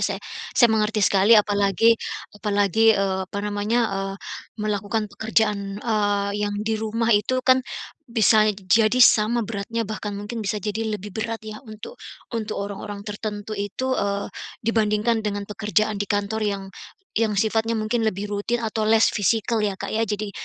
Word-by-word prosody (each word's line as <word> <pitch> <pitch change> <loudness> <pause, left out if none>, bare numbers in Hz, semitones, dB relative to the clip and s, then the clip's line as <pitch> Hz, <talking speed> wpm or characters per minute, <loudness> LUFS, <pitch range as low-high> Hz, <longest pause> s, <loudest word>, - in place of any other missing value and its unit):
saya - - -1 0.4
saya 240 -3 +6
mengerti 215 -1 +2
sekali, 200 +4 +5
apalagi 205 +1 +4 0.4
apalagi, 210 +1 +3
eee, 195 -1 0
apa 200 - -5
namanya, 210 +3 0
eee, 195 0 -3 0.5
melakukan 210 0 -2
pekerjaan, 205 -2 0
eee, 205 -2 0 0.2
yang 205 - -4
di 220 - 0
rumah 225 +1 +1
itu 210 +5 +2
kan, 260 0 +5 0.5
bisa 220 -2 +4
jadi 215 +4 +3
sama 225 +2 +4
beratnya, 225 +2 -3
bahkan 210 -1 -5
mungkin 205 +3 -5
bisa 210 0 -2
jadi 210 +2 -3
lebih 205 0 -10
berat 220 +2 -4
ya, 215 0 -7
untuk 215 - -10 0.3
untuk 220 -2 -3
orang-orang 200 0 -7
tertentu 210 0 -5
itu, 210 +6 -2
eee, 200 -4 -1 0.3
dibandingkan 220 0 +1
dengan 205 -1 -3
pekerjaan 210 0 -1
di 205 - -2
kantor 205 +1 -1
yang 200 -2 -1 0.5
yang 220 -2 +1
sifatnya 220 +2 +1
mungkin 220 +1 0
lebih 205 -1 -2
rutin 220 +4 -1
atau 220 -1 -1
less-physical 220 0 +2
ya, 210 -2 0
Kak, - - -6
ya. 225 +1 0
Jadi, 210 0 -3
210 Hz, 155 wpm, -23 LUFS, 205-225 Hz, 0.5 s, saya